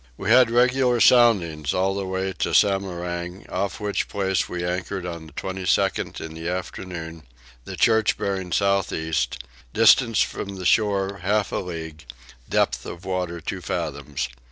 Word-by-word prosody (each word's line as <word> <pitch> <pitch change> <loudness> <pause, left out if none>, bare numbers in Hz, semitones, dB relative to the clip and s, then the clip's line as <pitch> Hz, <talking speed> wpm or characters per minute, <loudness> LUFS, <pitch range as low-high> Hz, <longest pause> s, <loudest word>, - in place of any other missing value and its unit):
We 100 +3 -2
had 125 0 +7
regular 125 +1 +3
soundings 90 - +4
all 95 +1 +1
the 100 -1 -3
way 95 0 -2
to - - 0
Samarang, 90 -2 0
off 95 +2 -2
which 105 -1 -1
place 95 -2 -1
we 90 0 -3
anchored 90 +1 -3
on 85 -2 -6
the 75 - -16
22nd 95 +1 -1
in 80 - -7
the 80 +1 -5
afternoon; 90 -2 -6 0.4
the - - -6
church 110 -1 +3
bearing 95 -2 -3
south 100 0 +1
east; 80 0 -2 0.3
distance 115 0 +5
from 100 0 -6
the 95 -1 -7
shore 100 -1 +2
half 100 +3 0
a - - -1
league: 80 -4 -6 0.4
depth - - +1
of 85 +2 -9
water 90 -2 -2
two - - -5
fathoms. 70 -4 -3
95 Hz, 155 wpm, -23 LUFS, 85-100 Hz, 0.4 s, had